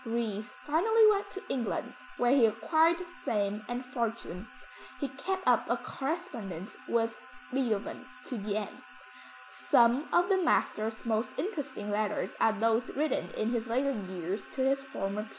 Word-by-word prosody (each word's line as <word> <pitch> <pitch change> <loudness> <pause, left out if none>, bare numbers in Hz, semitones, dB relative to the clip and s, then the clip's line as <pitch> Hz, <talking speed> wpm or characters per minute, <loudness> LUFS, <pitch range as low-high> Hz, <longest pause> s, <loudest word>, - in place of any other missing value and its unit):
Ries 225 -3 -2
finally 440 +9 +5
went 405 -1 0
to 390 - -8
England 245 0 -2 0.2
where 245 0 +3
he 255 -5 +6
acquired 320 +10 +3 0.3
fame 205 -1 0
and 245 +1 -3
fortune. 230 -5 -3 0.5
He 280 - -1
kept 375 +9 -3
up - - +4
a - - +2
correspondence 260 - -4
with 230 0 0 0.3
Beethoven 235 -6 -1 0.2
to 250 -5 -4
the 205 +1 -2
end; 215 - -5 0.7
some 240 +5 +3
of 350 0 +4
the 390 - +4
master's 220 -9 +1
most 225 0 -1
interesting 290 - -3
letters 210 0 0
are 225 - +5
those 225 +2 +1
written 300 0 0
in 220 +2 0
his 235 -1 -1
later 260 +4 +1 0.2
years 185 +2 -4
to 265 - 0
his 270 0 +2
former 205 -6 -3
pupil. 220 - -9
235 Hz, 150 wpm, -31 LUFS, 215-280 Hz, 0.7 s, he